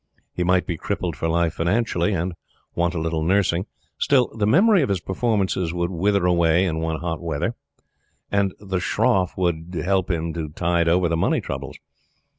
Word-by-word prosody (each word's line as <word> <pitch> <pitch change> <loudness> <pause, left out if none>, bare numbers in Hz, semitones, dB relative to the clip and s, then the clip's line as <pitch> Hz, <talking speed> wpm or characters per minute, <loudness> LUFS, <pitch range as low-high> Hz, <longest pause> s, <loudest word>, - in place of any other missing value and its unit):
He 90 - -1
might 90 +1 +2
be 85 - -3
crippled 85 +1 -3
for 80 - -2
life 85 -1 +1
financially, 90 +1 0
and 90 -1 -1 0.4
want 85 +1 0
a - - -1
little 80 0 -1
nursing. 90 +2 +1 0.3
Still 130 -4 +2
the 105 -2 0
memory 195 - +5
of 135 - 0
his 100 -2 +1
performances 95 -3 -1
would 85 +1 -1
wither 100 +2 +1
away 85 0 +3
in 80 -3 -1
one 80 -1 -2
hot 85 -1 -3
weather, 85 +6 -2 0.8
and 100 -1 +2
the 95 -3 -3
shroff 90 0 +1
would 85 -2 -1
help 95 0 +1
him 85 -2 -1
to 80 -2 -4
tide 85 +2 0
over 90 +1 +3
the 85 - 0
money 85 - +1
troubles. - - -6
90 Hz, 180 wpm, -23 LUFS, 85-95 Hz, 0.8 s, memory